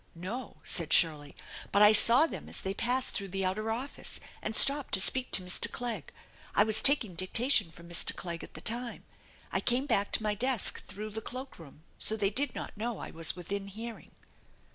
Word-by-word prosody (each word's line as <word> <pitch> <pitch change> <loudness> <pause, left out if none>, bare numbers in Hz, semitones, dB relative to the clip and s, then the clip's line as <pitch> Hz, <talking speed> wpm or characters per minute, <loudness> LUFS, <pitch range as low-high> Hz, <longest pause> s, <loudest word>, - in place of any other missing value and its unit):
" - - -35
No/' 210 +8 -7
said 165 -3 -1
Shirley. 150 -3 +2 0.2
" - - -13
But 200 - +4
I 210 +1 +7
saw 235 +7 +8
them - - -8
as - - -5
they 190 - -4
passed 250 +5 -1
through 200 - -3
the 195 0 -4
outer 215 +4 -3
office, 245 +5 -3 0.2
and 215 - -5
stopped 280 +2 +7
to - - 0
speak 255 +6 +2
to 185 - 0
Mr. 180 0 -1
Clegg. 230 -10 -5 0.4
I 205 - +5
was 220 0 +4
taking 270 -9 +3
dictation 185 +5 +1
from 170 +1 -15
Mr. 170 -1 -1
Clegg 170 -2 -7
at - - -13
the - - -10
time. 235 +1 -3 0.5
I - - 0
came 255 +3 +1
back 200 -8 -1
to - - -1
my 210 -1 -1
desk 245 +1 0
through 215 +1 -9
the 220 +2 -6
cloak 255 +1 -7
room, 155 -1 -15 0.2
so 220 - +2
they 200 -2 0
did 265 +3 -3
not - - -8
know 225 +1 -5
I - - -9
was 165 0 0
within 195 +3 -6
hearing." 225 +3 -9
215 Hz, 210 wpm, -29 LUFS, 185-245 Hz, 0.5 s, saw